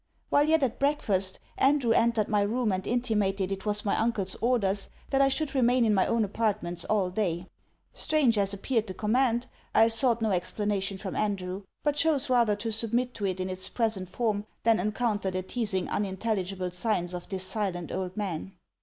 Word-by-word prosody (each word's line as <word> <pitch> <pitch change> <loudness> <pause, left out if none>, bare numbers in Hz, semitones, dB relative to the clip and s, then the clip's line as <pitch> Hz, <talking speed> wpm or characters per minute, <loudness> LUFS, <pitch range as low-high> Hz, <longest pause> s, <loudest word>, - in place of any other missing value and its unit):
While 290 +1 +5
yet 315 -1 +3
at 245 -3 -1
breakfast, 205 -10 0 0.2
Andrew 270 -3 +3
entered 225 -2 +3
my 210 -2 +2
room 220 +2 +1
and 185 0 -2
intimated 210 -6 0
it 195 +2 -4
was 210 0 0
my 200 - +2
uncle's 215 -5 0
orders 205 -5 +1 0.2
that 270 0 +3
I 275 - +5
should 280 +1 -1
remain 250 -2 +3
in 215 - +3
my 190 -2 +3
own 230 -2 +2
appartments 195 -5 -1
all 195 -4 +1
day. 180 -3 -1 0.5
Strange 285 -7 +2
as 195 -1 +1
appeared 220 +3 -1
the 185 - -6
command, 240 +3 +1 0.3
I 225 - +6
sought 230 +1 +3
no 220 -2 0
explanation 195 +2 -1
from 190 -1 -6
Andrew; 195 -2 -2 0.2
but 295 -1 +1
chose 290 -5 +2
rather 235 -4 +4
to 225 +2 -4
submit 235 +3 0
to 205 - -2
it 185 -1 -2
in 185 - -2
its 185 0 +1
present 215 -6 -1
form, 210 -1 -1 0.2
than 225 -2 +4
encounter 210 0 0
the 185 0 -3
teazing 200 -3 -1
unintelligible 190 -2 -2
signs 180 -2 -1
of 175 -1 -7
this 190 -2 -3
silent 185 -5 -3
old 185 0 -4
man. 190 -2 -3
210 Hz, 185 wpm, -28 LUFS, 190-235 Hz, 0.5 s, I